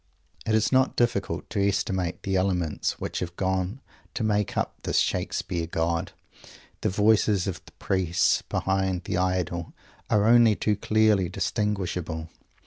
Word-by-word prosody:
It 110 - +3
is 110 -1 +2
not 130 0 +3
difficult 100 -8 0
to 100 -3 0
estimate 95 -3 -1
the 95 -1 -1
elements 90 -4 0
which - - -3
have 85 -1 -5
gone 95 +6 -1 0.3
to 120 - -1
make 105 -2 0
up - - 0
this - - -1
Shakespeare 85 -1 -1
God. 85 0 -1 0.7
The - - +1
voices 105 -1 +3
of 95 - -4
the - - -15
priests 90 -3 +1
behind 95 -1 0
the 90 - -2
Idol 90 -2 -1 0.4
are 105 -1 +3
only 115 -1 +6
too 105 +1 0
clearly 105 -3 +2
distinguishable. 90 -6 -2
95 Hz, 140 wpm, -26 LUFS, 90-105 Hz, 0.7 s, only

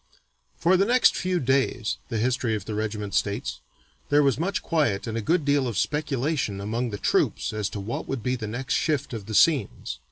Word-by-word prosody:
"For 180 +3 +3
the 195 - +3
next 250 +1 +5
few 180 -1 0
days," 130 -5 +1
the 115 - -2
history 120 0 0
of 105 - -5
the 110 - -4
regiment 105 -1 -3
states, 100 +1 -1 0.5
"there 145 0 +5
was 135 -2 +2
much 195 +4 -1
quiet 145 - +1
and 115 -1 -4
a 115 - -1
good 160 +6 +1
deal 140 -2 +2
of 115 -5 -3
speculation 140 -5 -1
among 115 +5 -2
the 105 - -4
troops - - +1
as 105 -2 -2
to 105 - -6
what 105 +4 -4
would 135 -5 -3
be 125 +2 0
the 110 -4 -5
next 120 +5 -3
shift 145 -5 0
of 110 -3 -6
the 110 - -3
scenes. 155 +1 +2
125 Hz, 210 wpm, -25 LUFS, 110-150 Hz, 0.5 s, next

